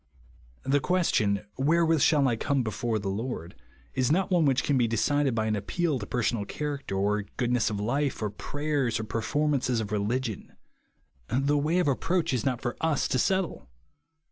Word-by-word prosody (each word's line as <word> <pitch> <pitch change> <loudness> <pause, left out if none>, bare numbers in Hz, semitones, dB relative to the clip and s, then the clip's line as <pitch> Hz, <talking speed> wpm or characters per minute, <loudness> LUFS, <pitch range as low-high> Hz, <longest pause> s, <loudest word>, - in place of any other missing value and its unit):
The 140 +1 +2
question, 130 - +1
"Wherewith 160 +2 +3
shall 145 -2 +4
I 120 - +2
como 135 +3 0
before 115 +1 -1
the 100 -2 -4
Lord 100 -3 -4 0.2
?" - - -31
is 130 +1 +1
not 190 +4 +1
one 175 -3 +4
which 135 -2 +2
can 145 - +1
be 120 -3 +3
decided 135 +4 +1
by 110 -1 0
an 110 -1 +1
appeal 145 - -1
to 100 - -6
personal 115 -3 0
character, 140 -1 -4
or 105 +2 +1 0.2
goodness 120 -3 +1
of 105 -2 -3
life, 135 +7 -1
or 105 -2 -2
prayers, 145 0 -1
or - - -3
perfonn 145 +8 -1
ances 125 -3 0
of 105 -2 -4
religion. 110 +1 -2 0.7
The 135 +4 +1
way 150 +4 +1
of 180 - +2
approach 165 +3 0
is 120 -4 0
not 125 -3 -1
for 120 -1 -2
us 160 -3 +1
to 130 - +1
settle. 185 - 0
130 Hz, 185 wpm, -27 LUFS, 110-150 Hz, 0.7 s, shall